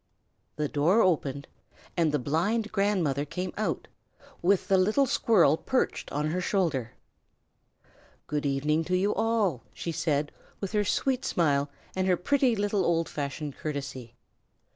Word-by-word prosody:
The 150 0 -1
door 165 +11 +3
opened, 140 -6 0 0.5
and 165 -3 +2
the 150 - +2
blind 190 - 0
grandmother 190 -9 +1
came 180 +5 -4
out, 215 - -2 0.5
with 190 +2 +2
the 195 -2 +4
little 215 +9 +3
squirrel 185 - +4
perched 260 +8 -1
on 150 +2 -1
her 180 +2 -1
shoulder. 160 - 0 1.3
"Good 150 -1 -2
evening 150 +3 +1
to 180 +2 +1
you 200 +3 +1
all!" 220 - +1
she 170 - -4
said, 150 -2 0 0.3
with 195 - -4
her 210 -1 +2
sweet 260 +5 0
smile 145 -4 +1 0.3
and 190 0 0
her 180 -1 +3
pretty 260 +4 +2
little 205 -1 0
old 165 -2 +1
fashioned 145 0 -4
courtesy. 135 -5 -5
170 Hz, 140 wpm, -28 LUFS, 145-205 Hz, 1.3 s, the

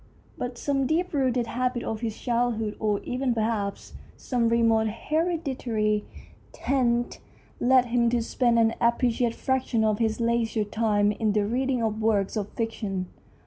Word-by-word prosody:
But 245 -1 -5
some 275 0 0
deep 340 +4 0
rooted 255 -4 +1
habit 250 0 -2
of 220 0 -4
his 225 -2 -3
childhood, 235 -3 -1
or 210 -2 0
even 250 -1 -1
perhaps 215 -3 -2 0.2
some 240 -3 0
remote 225 -1 +3
hereditary 250 -6 -1 0.5
taint, 240 -3 0 0.4
led 255 0 +4
him 235 0 +2
to 235 -1 +1
spend 240 0 +1
an 225 0 +3
appreciable 235 0 +2
fraction 260 -4 0
of 215 -1 +1
his 220 -1 0
leisure 230 -1 +1
time 205 -1 +1
in 210 0 0
the 210 -1 +2
reading 250 +2 0
of 220 0 -1
works 210 -2 +1
of 205 -2 -2
fiction. 205 -5 -3
230 Hz, 145 wpm, -26 LUFS, 220-250 Hz, 0.5 s, led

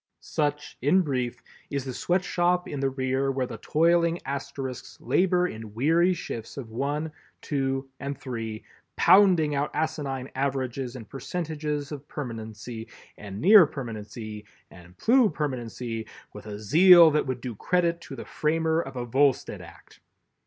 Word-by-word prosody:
Such, 150 -1 -2
in 180 +9 +4
brief, 125 -5 -2 0.3
is 140 -2 -3
the 130 - -4
Sweatshop 180 +2 +1
in 145 - -5
the 135 0 +1
rear 130 +1 0
where 130 -1 -1
the - - -8
toiling 170 +1 +2
Asterisks 135 -2 -5
labor 180 -1 +2
in 110 -6 -9
weary 165 +8 +3
shifts 115 -9 -7
of 120 -5 -7
one, 145 +6 -2 0.3
two 135 -2 -2
and 140 0 -4
three, 115 -4 -5 0.3
pounding 180 -6 +5
out 145 +1 0
asinine 145 -4 -2
averages 130 -2 -2
and 115 -4 -9
percentages 150 0 -4
of 145 -1 -7
permanency 115 -4 -7 0.3
and 100 -1 -8
near 190 - +8
permanency 110 -4 -7 0.3
and 90 +1 -15
plu 240 -1 +4
permanency 120 -6 -4 0.3
with 105 +1 -10
a 105 -1 -6
zeal 165 - +7
that 150 -1 +1
would 130 -1 -2
do 125 -1 -5
credit 170 - 0
to 135 - -9
the - - -8
framer 160 +1 0
of 135 -4 -8
a 120 -1 -3
Volstead 135 +2 +1
Act. - - -15
140 Hz, 145 wpm, -26 LUFS, 120-160 Hz, 0.3 s, near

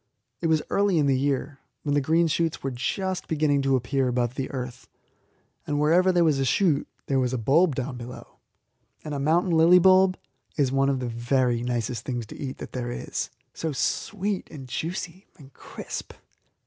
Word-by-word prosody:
It 165 - +1
was 160 -1 +2
early 200 -3 +2
in 150 - +3
the 135 -1 +3
year, 140 +1 -1 0.2
when 145 - 0
the 145 - +3
green 160 +5 +3
shoots 165 0 -1
were 135 - -1
just 185 +9 -2
beginning 150 -3 +2
to 135 0 +2
appear 130 +2 0
above 125 -1 0
the 135 0 -4
earth; 125 -2 -6 0.8
and 145 0 0
wherever 175 +5 +4
there 175 -1 +3
was 155 -4 +2
a - - +2
shoot 150 +2 +2 0.2
there 135 -1 +1
was 125 -1 0
a - - 0
bulb 145 +7 +3
down 125 -1 -3
below. 120 +1 -10 0.6
And 150 - -5
a 140 - -2
mountain 165 +6 +2
lily 165 +2 +6
bulb 185 +1 +5 0.4
is 140 -4 +2
one 135 0 +2
of 135 -2 0
the 125 - -2
very 120 +1 +1
nicest 120 -1 -2
things 120 -3 -3
to - - -11
eat 135 -2 -5
that - - -8
there 120 -1 -4
is 120 - -4 0.2
so 160 -2 -3
sweet, 200 +7 -2
and 135 -4 -9
juicy, 175 +6 -5
and 135 -3 -16
crisp! - - -7
140 Hz, 190 wpm, -26 LUFS, 130-165 Hz, 0.8 s, lily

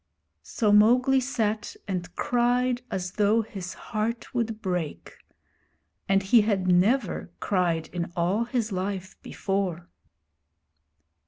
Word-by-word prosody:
So 210 - 0
Mowgli 250 +6 +5
sat 230 -4 -2
and 180 -2 -4
cried 245 0 +1
as 185 -1 -3
though 215 +3 +2
his 190 -4 -7
heart 225 +5 -4
would 230 -3 -1
break; 180 -7 -4 1.0
and 195 0 +3
he 220 +4 +5
had 200 -3 0
never 190 +5 +2
cried 170 -5 0
in 175 -1 -4
all 185 +7 +1
his 235 -2 -2
life 190 0 -3
before. 190 -3 -3
205 Hz, 110 wpm, -26 LUFS, 185-235 Hz, 1.0 s, Mowgli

